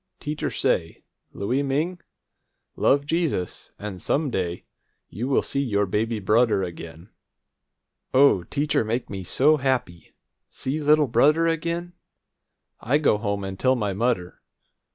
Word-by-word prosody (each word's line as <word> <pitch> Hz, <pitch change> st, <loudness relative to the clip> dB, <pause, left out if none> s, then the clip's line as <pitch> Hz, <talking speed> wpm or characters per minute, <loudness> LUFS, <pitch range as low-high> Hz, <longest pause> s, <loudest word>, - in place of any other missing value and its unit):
Teacher 150 Hz, 0 st, -3 dB
say, 80 Hz, 0 st, -1 dB, 0.3 s
'Louie 125 Hz, +8 st, -1 dB
Ming, 155 Hz, +6 st, -1 dB, 0.7 s
love 140 Hz, +1 st, +2 dB
Jesus, 160 Hz, -, -2 dB
an' 100 Hz, -3 st, -7 dB
some 145 Hz, -, 0 dB
day 90 Hz, -4 st, -3 dB, 0.4 s
you 130 Hz, +5 st, 0 dB
see 140 Hz, -, -1 dB
your 105 Hz, -6 st, +1 dB
baby 110 Hz, +4 st, -1 dB
brudder 105 Hz, 0 st, +2 dB
again.' 85 Hz, +1 st, -8 dB, 1.0 s
O, 130 Hz, -8 st, +5 dB
teacher 145 Hz, -, 0 dB
make 115 Hz, +3 st, -3 dB
me 95 Hz, -2 st, -5 dB
so 150 Hz, -, +3 dB
happy! 130 Hz, -, -2 dB, 0.3 s
See 145 Hz, +4 st, -4 dB
little 150 Hz, 0 st, +4 dB
brudder 150 Hz, +8 st, +4 dB
again! 170 Hz, +2 st, -2 dB, 0.9 s
I 130 Hz, +6 st, +1 dB
go 140 Hz, -9 st, +2 dB
home 100 Hz, -2 st, -2 dB
and 95 Hz, -1 st, -6 dB
tell 130 Hz, 0 st, +3 dB
my 105 Hz, -5 st, -1 dB
mudder. 100 Hz, -4 st, -1 dB
125 Hz, 130 wpm, -24 LUFS, 100-145 Hz, 1.0 s, O